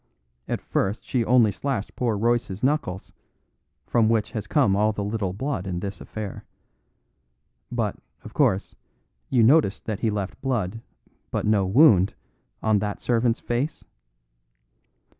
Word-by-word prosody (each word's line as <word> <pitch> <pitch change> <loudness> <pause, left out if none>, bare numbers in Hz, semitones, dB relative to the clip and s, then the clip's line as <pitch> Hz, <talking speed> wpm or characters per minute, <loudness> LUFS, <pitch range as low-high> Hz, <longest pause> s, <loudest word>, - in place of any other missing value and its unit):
At - - -2
first 100 +3 -1
she 125 -3 0
only 120 -2 +4
slashed 125 -4 -3
poor 115 -4 0
Royce's 115 -2 0
knuckles, 130 - -1 0.7
from 115 -2 +2
which 115 -2 +1
has 105 -3 -5
come 110 -6 +3
all 105 +2 +3
the 105 -1 -4
little 100 -2 -2
blood 105 -1 -3
in 90 -2 -2
this 95 -1 -6
affair. 105 -3 -6 1.3
But, - - -1 0.3
of 110 - -10
course, 115 -10 +1 0.6
you 120 -3 +4
noticed 130 -4 +4
that 110 -3 -3
he 115 - +1
left 100 -2 -4
blood, 115 -5 -2 0.5
but - - -2
no 105 -3 +2
wound, 100 - +5 0.5
on 110 -2 +3
that 105 0 -3
servant's 120 -1 +1
face? 125 +6 -2
110 Hz, 140 wpm, -24 LUFS, 100-120 Hz, 1.3 s, wound